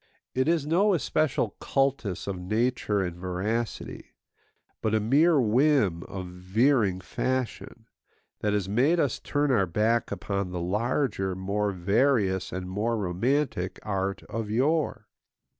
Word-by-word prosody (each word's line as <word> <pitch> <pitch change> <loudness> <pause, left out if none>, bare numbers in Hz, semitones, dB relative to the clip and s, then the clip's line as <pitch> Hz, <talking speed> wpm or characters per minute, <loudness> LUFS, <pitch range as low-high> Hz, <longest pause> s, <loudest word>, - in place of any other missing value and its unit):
It 130 +2 +1
is 165 -3 +2
no 185 +6 +3
especial 145 - 0
cultus 135 -9 0
of 95 -2 -4
nature 110 0 0
and 90 -2 -4
veracity, 95 +6 -4 0.7
but 110 0 +1
a - - +3
mere 145 +9 +4
whim 120 - +3
of 95 -1 -6
veering 95 +3 +1
fashion, 120 +2 -3 0.5
that 105 - 0
has 100 -2 0
made 130 - +2
us 140 -6 0
turn 145 -1 0
our 100 -7 +3
back 110 +6 +1
upon 100 -2 -2
the 90 -1 -4
larger, 105 +1 -1
more 100 +2 -1
various, 100 +1 +1
and 90 0 -4
more 110 +5 -1
romantic 100 +1 -1
art 100 -1 -2
of 115 -1 -5
yore. 130 -1 0
110 Hz, 130 wpm, -27 LUFS, 95-130 Hz, 0.7 s, mere